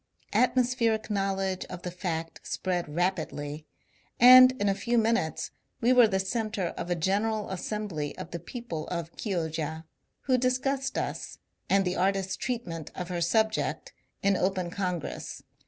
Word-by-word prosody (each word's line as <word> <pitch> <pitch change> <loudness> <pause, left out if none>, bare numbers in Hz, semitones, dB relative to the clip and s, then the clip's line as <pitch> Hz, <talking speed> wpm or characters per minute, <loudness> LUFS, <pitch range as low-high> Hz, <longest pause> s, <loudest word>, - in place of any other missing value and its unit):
Atmos 250 0 +3
pheric 225 -3 0
knowledge 195 -2 -1
of 180 -1 -9
the 180 - -4
fact 165 -2 -4
spread 175 -3 -2
rapidly, 155 -3 -2 0.5
and 255 +1 +10
in 205 -5 -1
a 195 - +3
few 235 +4 0
minutes 225 -8 +1 0.3
we 245 +2 +4
were 245 -3 +7
the 190 -2 0
centre 205 -2 -1
of 175 - -6
a 175 - +2
general 205 +5 0
assembly 190 -6 -3
of - - -7
the 170 - -4
people 175 -4 -6
of 170 -1 -4
Chioggia, 160 -5 -3 0.4
who 255 -2 +2
discussed 265 +2 0
us, - - -3 0.3
and 195 0 +4
the 180 0 -1
artist's 190 +1 +1
treat 245 -2 -3
ment 165 -3 -6
of 180 -1 -5
her 175 -1 -2
subject, 220 +5 0 0.3
in 200 0 +4
open 185 -1 0
congress. 180 -5 -4
190 Hz, 155 wpm, -28 LUFS, 170-225 Hz, 0.5 s, and